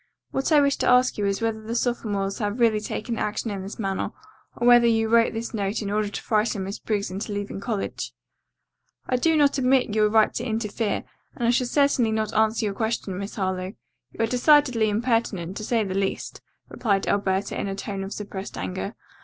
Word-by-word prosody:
What 270 Hz, +4 st, -1 dB
I 300 Hz, -, +7 dB
wish 280 Hz, 0 st, +2 dB
to -, -, +1 dB
ask 250 Hz, -2 st, +4 dB
you 205 Hz, -, +1 dB
is 200 Hz, +1 st, -1 dB
whether 225 Hz, -1 st, -1 dB
the 225 Hz, +2 st, -5 dB
sophomores 205 Hz, -5 st, -1 dB
have 210 Hz, +2 st, -2 dB
really 225 Hz, -3 st, +4 dB
taken 225 Hz, +2 st, -4 dB
action 210 Hz, +1 st, -2 dB
in 195 Hz, -1 st, -4 dB
this 195 Hz, +2 st, -7 dB
matter, 195 Hz, -3 st, -2 dB, 0.5 s
or 240 Hz, -, -2 dB
whether 240 Hz, -1 st, +7 dB
you 225 Hz, -1 st, +2 dB
wrote 230 Hz, +1 st, +4 dB
this 225 Hz, +2 st, -4 dB
note 205 Hz, 0 st, -1 dB
in 200 Hz, -, -3 dB
order 210 Hz, 0 st, 0 dB
to -, -, -5 dB
frighten 215 Hz, -2 st, +1 dB
Miss 195 Hz, +2 st, -5 dB
Briggs 205 Hz, -3 st, -2 dB
into 200 Hz, +3 st, -4 dB
leaving 205 Hz, -1 st, -4 dB
college?" 210 Hz, -1 st, -3 dB, 1.0 s
"I 255 Hz, -, +1 dB
do 320 Hz, +5 st, +2 dB
not 285 Hz, -1 st, +3 dB
admit 255 Hz, -3 st, +2 dB
your 215 Hz, -1 st, +3 dB
right 220 Hz, 0 st, +4 dB
to 235 Hz, -, -3 dB
interfere, 220 Hz, -2 st, -2 dB, 0.3 s
and 240 Hz, -, -1 dB
I -, -, +5 dB
shall 245 Hz, 0 st, +1 dB
certainly 280 Hz, -4 st, +2 dB
not 220 Hz, -1 st, -1 dB
answer 220 Hz, +1 st, +2 dB
your 205 Hz, -, -1 dB
question, 220 Hz, -3 st, -2 dB
Miss 200 Hz, +1 st, -6 dB
Harlowe. 185 Hz, -1 st, -2 dB, 0.4 s
You 225 Hz, -, -2 dB
are -, -, +5 dB
decidedly 250 Hz, -2 st, +4 dB
impertinent, 210 Hz, -5 st, 0 dB
to -, -, -5 dB
say 230 Hz, 0 st, +1 dB
the 190 Hz, -2 st, -3 dB
least," 195 Hz, 0 st, -2 dB, 0.3 s
replied 200 Hz, -5 st, 0 dB
Alberta 200 Hz, 0 st, 0 dB
in -, -, -3 dB
a 195 Hz, -, -3 dB
tone 195 Hz, 0 st, -4 dB
of 195 Hz, -, -6 dB
suppressed 200 Hz, -2 st, -6 dB
anger. 190 Hz, +4 st, -4 dB
215 Hz, 205 wpm, -25 LUFS, 200-235 Hz, 1.0 s, I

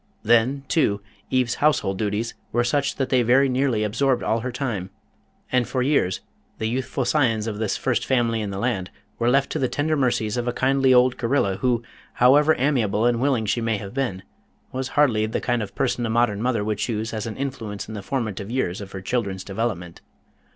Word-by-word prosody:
Then, 120 Hz, +5 st, +3 dB
too, 105 Hz, -11 st, +1 dB, 0.3 s
Eve's 125 Hz, -2 st, +1 dB
household 115 Hz, -11 st, +2 dB
duties 110 Hz, +2 st, -1 dB, 0.2 s
were 120 Hz, -, +2 dB
such 140 Hz, +3 st, 0 dB
that 135 Hz, -, -2 dB
they 130 Hz, -2 st, +3 dB
very 130 Hz, +4 st, +4 dB
nearly 130 Hz, -4 st, +1 dB
absorbed 125 Hz, +4 st, +1 dB
all 115 Hz, -, +1 dB
her 125 Hz, +3 st, -4 dB
time, 120 Hz, -8 st, -3 dB, 0.6 s
and 125 Hz, -2 st, +2 dB
for 130 Hz, -1 st, -1 dB
years 125 Hz, -10 st, +1 dB, 0.4 s
the 110 Hz, -, -3 dB
youthful 130 Hz, +2 st, -2 dB
scions 115 Hz, -8 st, +2 dB
of 105 Hz, -2 st, -4 dB
this 110 Hz, -2 st, -1 dB
first 120 Hz, -2 st, 0 dB
family 115 Hz, -4 st, +1 dB
in 105 Hz, -, -3 dB
the 100 Hz, -, -5 dB
land 100 Hz, -4 st, -1 dB, 0.3 s
were 120 Hz, +1 st, +2 dB
left 140 Hz, +2 st, +2 dB
to -, -, -1 dB
the 130 Hz, -, +1 dB
tender 155 Hz, +2 st, 0 dB
mercies 120 Hz, -5 st, 0 dB
of 120 Hz, 0 st, -2 dB
a 120 Hz, -, 0 dB
kindly 135 Hz, 0 st, +2 dB
old 125 Hz, 0 st, +5 dB
Gorilla 115 Hz, -6 st, +1 dB
who, 120 Hz, -2 st, +1 dB, 0.3 s
however 145 Hz, +5 st, +5 dB
amiable 120 Hz, -6 st, +1 dB
and 120 Hz, -1 st, +2 dB
willing 130 Hz, -5 st, +1 dB
she 105 Hz, +3 st, 0 dB
may 115 Hz, -1 st, 0 dB
have 100 Hz, +1 st, -8 dB
been, 120 Hz, -9 st, -2 dB, 0.5 s
was 130 Hz, 0 st, -3 dB
hardly 115 Hz, -7 st, +3 dB
the 110 Hz, -, -2 dB
kind 120 Hz, -1 st, 0 dB
of 100 Hz, -2 st, -6 dB
person 125 Hz, -3 st, 0 dB
a 115 Hz, -, -1 dB
modern 110 Hz, -3 st, +1 dB
mother 120 Hz, -3 st, 0 dB
would 105 Hz, -1 st, -2 dB
choose 110 Hz, -1 st, -2 dB
as 110 Hz, 0 st, -3 dB
an 110 Hz, -, -6 dB
influence 115 Hz, -7 st, -4 dB
in 110 Hz, -, -7 dB
the 105 Hz, -, -5 dB
formative 105 Hz, -4 st, -3 dB
years 110 Hz, -7 st, -1 dB
of 95 Hz, -1 st, -9 dB
her 95 Hz, -, -5 dB
children's 100 Hz, -3 st, -2 dB
development. 95 Hz, -5 st, -4 dB
120 Hz, 205 wpm, -23 LUFS, 105-130 Hz, 0.6 s, old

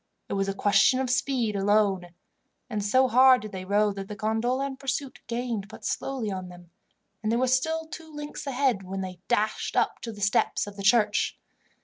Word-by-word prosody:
It -, -, -2 dB
was 195 Hz, 0 st, 0 dB
a 195 Hz, -, -2 dB
question 205 Hz, +6 st, +4 dB
of 260 Hz, -2 st, 0 dB
speed 255 Hz, -5 st, 0 dB
alone, 195 Hz, -3 st, +1 dB, 0.6 s
and 210 Hz, -2 st, -2 dB
so 255 Hz, +6 st, +4 dB
hard 255 Hz, 0 st, +6 dB
did 215 Hz, -, -7 dB
they 185 Hz, -2 st, -6 dB
row 205 Hz, +2 st, +2 dB
that 195 Hz, -1 st, -6 dB
the 210 Hz, -, -6 dB
gondola 225 Hz, +6 st, 0 dB
in 275 Hz, -1 st, -4 dB
pursuit 275 Hz, 0 st, -3 dB
gained 235 Hz, -4 st, -3 dB
but 220 Hz, -, -11 dB
slowly 255 Hz, -6 st, -2 dB
on 185 Hz, -1 st, -5 dB
them, 175 Hz, -1 st, -14 dB, 0.5 s
and 215 Hz, 0 st, -1 dB
they -, -, +2 dB
were 255 Hz, -, +2 dB
still 320 Hz, +6 st, +1 dB
two 320 Hz, -1 st, -10 dB
lengths 295 Hz, -1 st, -7 dB
ahead 260 Hz, -6 st, +1 dB
when 190 Hz, +1 st, -5 dB
they 185 Hz, -2 st, -6 dB
dashed 215 Hz, +1 st, 0 dB
up -, -, +1 dB
to 230 Hz, -, -5 dB
the 210 Hz, -, -11 dB
steps 205 Hz, +1 st, +2 dB
of 205 Hz, -1 st, -9 dB
the 200 Hz, -, -7 dB
church. 210 Hz, +1 st, +3 dB
215 Hz, 205 wpm, -27 LUFS, 200-260 Hz, 0.6 s, hard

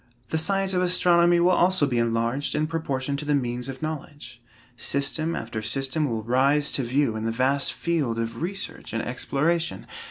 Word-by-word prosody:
The 160 Hz, -, 0 dB
science 195 Hz, +3 st, +1 dB
of 180 Hz, -, +1 dB
astronomy 175 Hz, -1 st, +4 dB
will 175 Hz, +1 st, +4 dB
also 180 Hz, -2 st, +4 dB
be 125 Hz, -4 st, 0 dB
enlarged 115 Hz, +4 st, 0 dB
in 155 Hz, -, +1 dB
proportion 140 Hz, -4 st, -2 dB
to 145 Hz, -, -4 dB
the 145 Hz, 0 st, +1 dB
means 125 Hz, -1 st, -2 dB
of 135 Hz, +2 st, -7 dB
knowledge. 145 Hz, -5 st, -6 dB, 0.3 s
System 140 Hz, +6 st, -1 dB
after 115 Hz, -1 st, -4 dB
system 135 Hz, +7 st, 0 dB
will 110 Hz, -2 st, -3 dB
rise 140 Hz, +5 st, +2 dB
to -, -, -1 dB
view 125 Hz, -1 st, +1 dB
in 110 Hz, 0 st, -3 dB
the 115 Hz, -, 0 dB
vast 130 Hz, +4 st, +1 dB
field 150 Hz, -9 st, -1 dB
of 115 Hz, +3 st, -4 dB
research 190 Hz, -5 st, -3 dB
and 115 Hz, -, -1 dB
exploration! 160 Hz, +7 st, -1 dB
140 Hz, 180 wpm, -25 LUFS, 120-165 Hz, 0.3 s, astronomy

